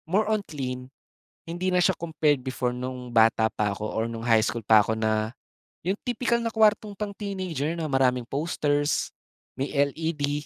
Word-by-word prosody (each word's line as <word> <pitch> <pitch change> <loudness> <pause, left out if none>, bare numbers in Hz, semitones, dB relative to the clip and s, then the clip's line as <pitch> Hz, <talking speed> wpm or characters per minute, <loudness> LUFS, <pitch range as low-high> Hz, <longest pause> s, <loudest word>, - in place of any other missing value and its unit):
More 205 +5 +3
on 215 -1 +2
clean. 130 -7 -5 0.6
Hindi 175 +3 -2
na 180 - +2
siya 185 +1 +4
compared 155 -4 +1
before 125 -1 -2
nung 125 -1 -6
bata 110 -1 +5
pa 105 -1 0
ako 105 +2 -4
or 115 +1 -1
nung 115 0 -6
high 115 -2 +5
school 115 -1 -2
pa 110 0 +7
ko 110 +2 -2
na 110 0 0 0.5
yung 190 +4 0
tipikal 245 -1 +1
na 230 -1 -3
kuwartong 215 -1 +3
pang 205 +1 -4
teenager 185 -8 -3
na 165 -2 -3
maraming 130 -2 +2
posters, 145 0 0 0.5
may 135 +2 -2
LED 145 0 0
145 Hz, 170 wpm, -26 LUFS, 120-180 Hz, 0.6 s, pa